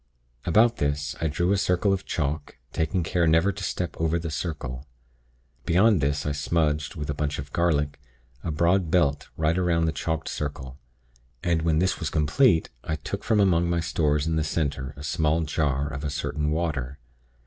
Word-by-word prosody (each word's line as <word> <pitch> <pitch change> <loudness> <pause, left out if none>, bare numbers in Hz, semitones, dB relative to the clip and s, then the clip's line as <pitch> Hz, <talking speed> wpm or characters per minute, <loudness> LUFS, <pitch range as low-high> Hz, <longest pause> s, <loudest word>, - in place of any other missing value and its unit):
About 115 +7 +4
this, 70 0 -1
I 80 - +1
drew 85 +5 0
a 100 - +3
circle 95 +2 +2
of 95 -1 -3
chalk, 75 -1 -2 0.2
taking 85 +3 0
care 85 0 +1
never 80 +5 +4
to - - -7
step 90 -2 -3
over 80 +1 +2
the 85 -1 -4
circle. 75 -5 -4 0.8
Beyond 95 +1 +4
this 70 +1 0
I 75 - 0
smudged, 75 0 0
with 75 -3 -4
a - - -2
bunch 75 0 -2
of 70 0 -7
garlic, 75 -4 +1 0.4
a - - -3
broad 85 +3 +2
belt 75 -4 +1
right 80 +1 +2
around 85 -3 +2
the 80 - +1
chalked 80 +1 -3
circle, 70 -3 -5 0.6
and 85 -2 +1
when 80 -1 +2
this 95 +3 +1
was 80 - -2
complete, 80 - +3
I 80 - -2
took 75 - -5
from 110 - +2
among 85 -3 +3
my 85 0 +1
stores 75 -2 +1
in 80 0 0
the 80 - +1
center 70 -3 -2
a 70 - -8
small 80 +2 +1
jar 75 -2 0
of 70 +2 -5
a 75 - -1
certain 75 +1 -2
water. 75 -5 -2
80 Hz, 185 wpm, -26 LUFS, 75-85 Hz, 0.8 s, About